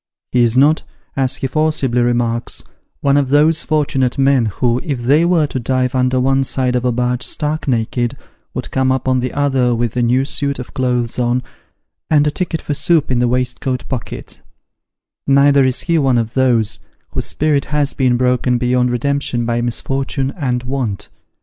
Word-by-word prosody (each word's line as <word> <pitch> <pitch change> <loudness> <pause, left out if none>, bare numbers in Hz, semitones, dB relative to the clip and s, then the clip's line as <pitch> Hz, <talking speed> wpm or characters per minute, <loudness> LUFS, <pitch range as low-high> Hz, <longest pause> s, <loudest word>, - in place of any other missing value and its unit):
He 125 - +3
is 120 +1 +2
not, 150 +4 +4 0.3
as 130 -2 0
he - - -4
forcibly 140 -5 0
remarks, 120 -1 -1 0.2
" - - -48
one 140 0 +3
of 140 -2 +1
those 150 +3 +3
fortunate 135 -4 0
men 135 -4 +3
who, 120 +4 0
if 140 -8 -3
they 145 +7 +3
were 170 -3 +3
to 135 -2 -4
dive 130 +1 0
under 130 0 +1
one 135 +1 +2
side 130 -1 0
of 125 - 0
a 125 - +1
barge 125 +1 -1
stark 150 +4 -2
naked, 120 +1 -1 0.4
would 125 - -5
come 130 0 +1
up 130 0 -1
on 130 -1 +2
the 125 0 -2
other 135 -4 +1
with 120 0 -2
a 125 - +1
new 125 +3 +2
suit 140 0 -1
of 125 - -8
clothes 125 -3 -1
on, 125 +1 0 0.7
and 150 -2 +4
a 150 - +1
ticket 170 -1 -3
for 145 - -2
soup 155 -1 +1
in 125 - +1
the 120 - +2
waistcoat 125 +1 -2
pocket: 130 -4 -6 0.4
" - - -69
neither 140 0 +5
is 130 -1 0
ho 165 -2 +1
one 130 -3 +2
of 115 0 -2
those, 120 -5 +1 0.3
whose - - -3
spirit 150 -2 0
has 145 -1 0
been 125 -3 +1
broken 125 0 +1
beyond 125 0 +1
redemption 125 -1 -1
by 120 0 0
misfortune 135 +3 -2
and 125 -6 -2
want. 125 -6 -3
130 Hz, 190 wpm, -17 LUFS, 125-140 Hz, 0.7 s, neither